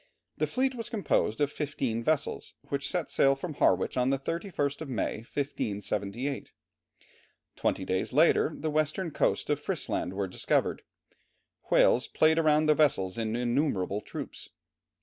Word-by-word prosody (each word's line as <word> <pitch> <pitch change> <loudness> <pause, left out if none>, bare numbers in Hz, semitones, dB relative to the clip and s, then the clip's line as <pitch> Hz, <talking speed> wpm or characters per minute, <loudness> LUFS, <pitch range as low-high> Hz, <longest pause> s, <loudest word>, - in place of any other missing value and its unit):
The - - +2
fleet 260 +1 0
was 235 -2 -5
composed 200 - 0
of 145 0 +2
fifteen 130 -7 -2
vessels, 155 +2 -1
which 140 -1 -1
set 180 -4 -2
sail 135 0 +4
from 155 +4 -5
Harwich 140 - +2
on 125 +1 +2
the 135 - +2
31st 155 -1 -3
of 155 - -5
May, 115 -6 -1
1578. 115 0 -3 1.0
Twenty 95 - -1
days 95 0 -1
later 155 +3 +4
the 155 0 -3
western 155 +3 0
coasts - - 0
of - - +1
Frisland 90 - -2
were 100 0 -2
discovered. 90 - 0 0.9
Whales 125 - +4
played 160 +1 +3
round 155 -1 +3
the 155 - +6
vessels 115 -11 +2
in 110 0 -1
innumerable 120 - 0
troops. - - -7
140 Hz, 145 wpm, -29 LUFS, 115-155 Hz, 1.0 s, the